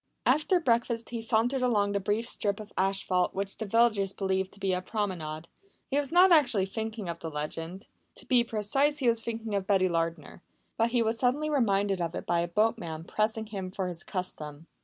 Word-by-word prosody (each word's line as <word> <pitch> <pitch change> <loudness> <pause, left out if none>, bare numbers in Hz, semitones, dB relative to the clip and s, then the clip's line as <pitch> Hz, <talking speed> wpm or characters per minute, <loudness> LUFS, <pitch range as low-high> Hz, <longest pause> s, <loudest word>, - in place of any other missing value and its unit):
After 305 +7 +3
breakfast 235 -4 0
he 235 -1 -3
sauntered 235 +3 +1
along 210 -5 +2
the 200 - 0
brief 210 +4 -1
strip 205 -4 -2
of 215 -1 -10
asphalt 190 -1 +1
which 195 0 -3
the 220 - -4
villagers 215 -3 +3
believe 190 -1 -1
to 200 - -16
be 195 -2 0
a 180 - -1
promenade. 175 -6 -3 0.4
He 280 - +2
was 285 0 -3
not 360 +2 +6
actually 245 - +4
thinking 220 0 -5
of 170 0 -4
the 165 - -5
legend; 165 +6 -5 0.3
to - - -13
be 250 -3 +4
precise, 240 +7 +1
he 265 -4 0
was 230 -1 +3
thinking 225 -2 -4
of 195 -1 -1
Betty 190 -2 +3
Lardner, 165 -1 -3 0.3
but 230 +1 +2
he 235 -1 +2
was 225 +1 0
suddenly 290 +5 +1
reminded 200 -8 +1
of 165 0 -2
it - - -5
by 170 - +1
a 170 - 0
boatman 175 -4 0
pressing 220 +4 -1
him 195 -4 -5
for 190 0 -3
his 175 -2 -2
custom. 160 -5 -5
205 Hz, 200 wpm, -29 LUFS, 185-235 Hz, 0.4 s, not